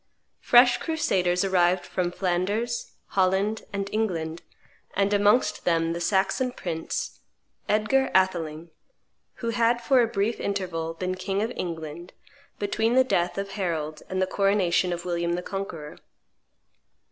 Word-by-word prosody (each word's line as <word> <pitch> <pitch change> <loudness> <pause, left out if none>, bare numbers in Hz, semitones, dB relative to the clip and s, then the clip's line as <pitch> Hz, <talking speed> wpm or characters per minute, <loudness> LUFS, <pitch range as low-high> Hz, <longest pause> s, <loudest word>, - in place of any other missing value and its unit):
Fresh 245 0 +6
crusaders 185 - +1
arrived 180 -1 +2
from 180 -1 -1
Flanders, 200 +7 -1 0.2
Holland, 195 +3 +1
and 200 0 -3
England, 170 -7 -1 0.5
and 200 +1 +2
amongst 205 +4 +3
them 165 -1 +1
the 170 - -4
Saxon 195 +8 +1
prince, 165 -6 -4 0.5
Edgar 215 +6 +2
Atheling, 170 -4 +1 0.7
who - - +1
had 235 0 +2
for 255 +1 +4
a 235 - +3
brief 220 0 -1
interval 170 -5 -3
been 185 +2 -2
king 195 +2 -2
of 225 - -2
England, 165 0 -6 0.4
between 220 +3 0
the 260 - +6
death 175 -9 0
of 195 0 -3
Harold 160 -6 -3
and 185 - -2
the 185 - +3
coronation 190 -2 +2
of 175 0 -4
William 170 -1 -1
the 180 +1 -2
Conqueror. 175 -7 -6
190 Hz, 135 wpm, -26 LUFS, 175-215 Hz, 0.7 s, Fresh